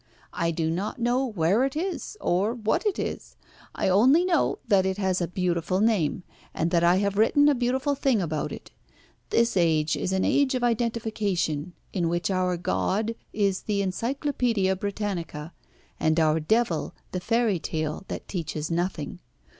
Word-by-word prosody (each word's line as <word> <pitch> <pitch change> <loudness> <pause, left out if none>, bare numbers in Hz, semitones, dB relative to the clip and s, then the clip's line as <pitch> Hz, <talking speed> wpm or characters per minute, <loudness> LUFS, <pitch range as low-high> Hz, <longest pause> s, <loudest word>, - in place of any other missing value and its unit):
I 170 - 0
do 160 -1 -1
not 195 +9 -3
know 240 +2 +1
where 210 -1 +1
it 270 +1 -1
is, 375 +5 -3
or 200 +7 +1
what 225 - 0
it 400 - 0
is. - - -5 0.4
I - - 0
only 255 - +5
know 345 -4 +2
that 200 -4 +4
it 190 0 -1
has 190 -2 0
a 175 - 0
beautiful 180 0 -1
name, 195 -6 +1 0.3
and 165 +1 0
that 170 -1 +3
I 175 +1 +5
have 200 +1 0
written 290 +6 +5
a 295 - +5
beautiful 260 +3 0
thing 270 -4 +1
about 155 -5 -2
it. - - -9 0.6
This 235 0 +2
age 160 -4 +2
is 185 - -2
an 190 0 +1
age 280 -2 +2
of 250 - -1
identification, 215 -9 -1 0.2
in 175 -4 0
which 175 +3 -1
our 185 -1 +1
god 210 +5 0 0.2
is 200 -2 0
the 205 -2 -1
Encyclopædia 230 -1 0
Britannica, 185 -7 -4 0.5
and 160 +1 +2
our 155 0 +3
devil 185 0 0 0.2
the 185 - -2
fairy 225 -1 +1
tale 155 +1 -3
that - - -6
teaches 160 -3 -4
nothing. 175 -1 -2
195 Hz, 165 wpm, -26 LUFS, 170-235 Hz, 0.6 s, only